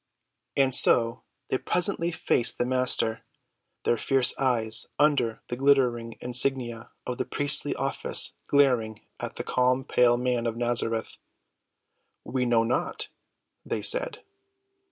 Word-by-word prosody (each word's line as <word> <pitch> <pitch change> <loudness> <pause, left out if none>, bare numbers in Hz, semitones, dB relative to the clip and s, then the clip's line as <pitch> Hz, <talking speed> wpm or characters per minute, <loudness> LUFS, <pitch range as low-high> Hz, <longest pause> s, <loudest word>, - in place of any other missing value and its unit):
And 135 -2 +2
so 115 -2 +4 0.3
they 130 - 0
presently 175 -1 +2
faced 125 -6 0
the 120 - 0
Master, 125 -3 0 0.6
their 120 - +2
fierce 135 +1 +2
eyes 115 -4 0
under 140 -6 +1
the 120 - -4
glittering 125 -4 +1
insignia 120 -2 -1 0.2
of 125 - -5
the - - +1
priestly 145 -1 0
office - - 0
glaring 125 -7 +2 0.2
at - - -6
the - - -5
calm, 125 +1 +1
pale 120 -1 +3
Man 125 -1 -1
of 115 0 -3
Nazareth. 115 -2 -2 1.1
"We 125 -1 -2
know 115 -1 +3
not," 115 +2 -2 0.5
they - - -4
said. - - 0
125 Hz, 125 wpm, -26 LUFS, 115-135 Hz, 1.1 s, so